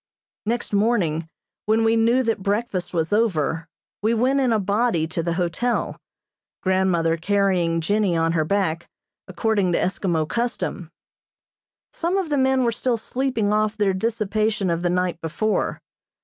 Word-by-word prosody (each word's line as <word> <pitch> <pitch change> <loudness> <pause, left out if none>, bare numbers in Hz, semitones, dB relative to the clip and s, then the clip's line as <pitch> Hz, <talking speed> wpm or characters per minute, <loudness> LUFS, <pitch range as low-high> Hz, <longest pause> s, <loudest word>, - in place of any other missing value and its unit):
Next 235 -1 -2
morning, 190 -7 +1 0.4
when 220 +1 +3
we 225 0 +3
knew 230 +3 +3
that 225 -4 -1
breakfast 200 -2 -1
was 165 +2 -1
over, 165 -7 +1 0.3
we 220 +3 +2
went 260 +4 +2
in 260 -3 +2
a 225 - +3
body 200 -3 +1
to 165 +1 -3
the 170 0 -1
hotel, 180 +8 -1 0.7
grandmother 185 -3 +2
carrying 180 -3 +1
Jennie 200 0 +1
on 165 0 +2
her 165 -2 +1
back, 170 -1 -1 0.4
according 205 -6 0
to - - +3
Eskimo 175 -4 0
custom. 235 -7 -3 1.0
Some 350 +3 -1
of 375 -5 -1
the 290 -2 +1
men 265 0 +3
were 235 - +2
still 240 +1 -1
sleeping 230 -3 -1
off 215 0 +1
their 200 -2 +2
dissipation 215 -1 0
of 170 0 -1
the 175 - +1
night 180 -1 -1
before. 210 +7 -1
205 Hz, 150 wpm, -23 LUFS, 170-230 Hz, 1.0 s, when